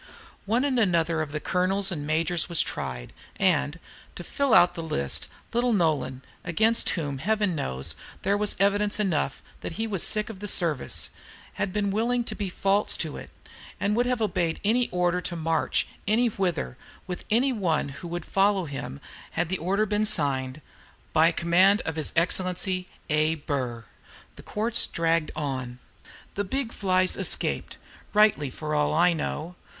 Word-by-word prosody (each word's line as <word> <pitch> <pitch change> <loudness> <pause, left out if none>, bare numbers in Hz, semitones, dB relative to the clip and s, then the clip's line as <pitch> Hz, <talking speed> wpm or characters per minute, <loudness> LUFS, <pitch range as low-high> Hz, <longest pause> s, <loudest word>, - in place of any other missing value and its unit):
One 235 +6 +2
and 260 -3 +1
another 170 -5 +2
of 150 -2 -4
the 150 - -2
colonels 190 +3 +1
and 145 -4 -4
majors 165 +3 +1
were 170 - -5
tried, 65 - 0 0.2
and, 65 +2 +1 0.4
to 175 - -7
fill 280 +8 -1
out 175 -5 +6
the 170 - -5
list, 70 - -1 0.3
little 240 0 +2
Nolan, 155 -8 0 0.2
against 220 +7 +2
whom, 145 -4 -3
Heaven 210 +3 +1
knows, 65 - -3 0.3
there 200 - +2
was 210 0 +1
evidence 205 +2 +2
enough, 165 -9 0 0.2
that - - -6
he 220 +6 -2
was 200 -6 -1
sick 215 +1 +2
of 195 - -11
the 205 - -5
service, 165 -8 +1 0.5
had 195 -2 0
been 200 0 0
willing 235 +4 +1
to - - -4
be 200 -2 -3
false 195 +3 +1
to 155 -3 -3
it, - - -9 0.5
and 200 +3 +1
would 245 +2 +2
have 250 -3 0
obeyed 170 -6 0
any 240 +4 +3
order 180 0 +1
to 175 - -4
march 165 0 0 0.2
any 230 +3 +3
whither 175 - -2 0.3
with 180 -1 -5
any 255 +5 +3
one 170 -10 0
who 140 +6 -8
would 175 -1 -5
follow 195 -1 +2
him 135 - -6 0.3
had 165 0 0
the 185 - -1
order 195 +6 +1
been 210 +1 +1
signed, 135 -5 +1 0.5
"By 160 +2 +5
command 180 +5 +4
of 160 - -4
His 155 -2 -1
Exc. 185 +1 0 0.2
A. 155 +1 +2
Burr." 130 -6 -3 0.5
The - - -11
courts 220 +2 -1
dragged 165 -1 +1
on. 130 -4 -3 0.6
The 205 - -1
big 240 +4 -2
flies 185 -2 +2
escaped, - - -2 0.4
rightly 210 -9 +4
for 150 +4 -5
all 150 0 +2
I 175 +2 +5
know. 160 +1 -4
180 Hz, 165 wpm, -26 LUFS, 155-210 Hz, 0.6 s, out